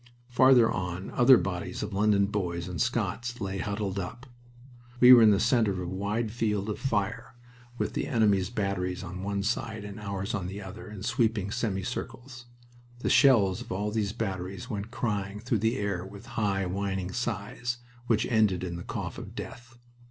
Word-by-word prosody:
Farther 125 -2 +6
on 90 +1 -4
other 125 0 +7
bodies 90 -4 -3
of - - -5
London 100 0 +3
boys 90 -4 -2
and 90 -1 -3
Scots 120 +1 -1
lay 95 -2 -3
huddled 100 -1 -2
up. 115 +7 -6 0.7
We 125 0 +10
were 120 - +9
in 110 - +8
the 100 -2 +4
center 115 -5 +3
of 95 - -4
a 90 - -3
wide 100 +5 -2
field 105 -3 -1
of - - -5
fire, 115 -2 -2 0.4
with - - -2
the - - -2
enemy's 105 -7 +2
batteries 95 -5 -2
on 90 +1 -6
one 100 0 -2
side 110 0 -2
and 100 +1 -8
ours 100 -1 -4
on 95 -4 -2
the 95 +2 -6
other 95 0 -9
in 105 -2 -8
sweeping 115 -4 0
semicircles. 120 +3 -4 0.5
The - - 0
shells 105 -10 +5
of - - -9
all 100 +3 -1
these 105 -2 0
batteries 100 +2 -4
went 105 0 -4
crying 105 -4 -2
through 115 0 0
the 110 +4 +1
air 100 -3 -2
with 100 +3 -11
high, 100 -3 0
whining 95 0 -2
sighs, 120 +1 -3 0.3
which 110 -2 +2
ended 105 -6 +2
in 85 -2 -4
the 85 - -7
cough - - -5
of - - -9
death. 120 -1 -9
105 Hz, 180 wpm, -28 LUFS, 95-115 Hz, 0.7 s, We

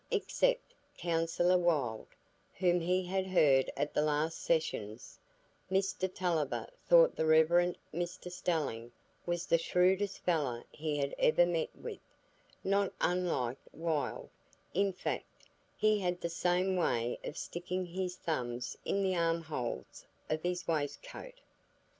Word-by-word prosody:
Except - - +1 0.2
Counsellor 170 +1 +2
Wylde, 145 -11 0 0.5
whom 180 -1 +3
he 180 +2 +1
had 190 +1 -1
heard 140 -8 +4
at 145 - -1
the - - +2
last 155 +2 0
sessions, 115 -9 -2 0.5
Mr 190 -1 0
Tulliver 170 -7 -1 0.2
thought - - +7
the 160 - 0
Rev. 170 +3 +5 0.2
Mr 175 +1 -4
Stelling 145 -10 -2 0.4
was 175 0 -1
the 170 - +3
shrewdest 190 +4 +2
fellow 140 -9 0
he 150 -1 -2
had 140 -1 -1
ever 175 +3 +5
met 170 -2 0
with,—not 200 0 -4
unlike 170 -9 0
Wylde, 160 -3 -2 0.4
in 195 +1 +2
fact; 185 - -5 0.3
he 215 -1 +3
had 180 -2 -1
the 170 - -2
same 180 +2 +1
way 120 -9 0
of 150 - -6
sticking 180 +1 -3
his 180 +1 -3
thumbs 125 -8 -3
in 200 - 0
the 190 -1 +1
armholes 165 -7 -2 0.2
of 155 0 0
his 180 0 -2
waistcoat. 160 - -4
175 Hz, 125 wpm, -33 LUFS, 155-185 Hz, 0.5 s, thought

